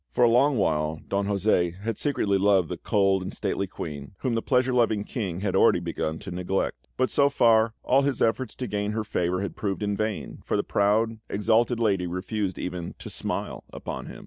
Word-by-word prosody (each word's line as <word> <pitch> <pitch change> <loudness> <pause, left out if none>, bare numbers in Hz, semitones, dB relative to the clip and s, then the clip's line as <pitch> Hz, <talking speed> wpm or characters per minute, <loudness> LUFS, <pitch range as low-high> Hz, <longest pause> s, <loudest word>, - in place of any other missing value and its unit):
For 125 - +1
a 120 - +6
long 135 +3 +4
while 80 -4 0
Don 100 0 0
José 95 -3 +1
had 110 +2 -2
secretly 105 -9 +1
loved 95 -3 +3
the - - -4
cold 95 -2 +2
and 95 +2 -5
stately 100 -1 -2
Queen, 75 -2 -7
whom 130 - 0
the 115 - 0
pleasure 125 0 +2
loving 115 -4 +2
King 95 -7 -4
had 100 -2 -1
already - - +5
begun 80 0 -3
to 100 -2 -7
neglect; 90 +2 -2
but 130 0 +1
so 140 0 +4
far, 115 -4 +4
all 135 +2 +4
his 140 -3 0
efforts 115 +1 0
to 130 - -4
gain 105 0 -2
her 110 0 -1
favour 90 -2 -1
had 100 - -4
proved 100 0 -2
in 105 0 0
vain, 110 0 -3
for - - 0
the - - +1
proud, 110 +2 +1
exalted 115 +3 +2
lady 100 -6 +1
refused 95 +2 -3
even 90 -1 -5
to - - -8
smile - - -3
upon - - -6
him. - - -9
105 Hz, 205 wpm, -26 LUFS, 95-115 Hz, -, a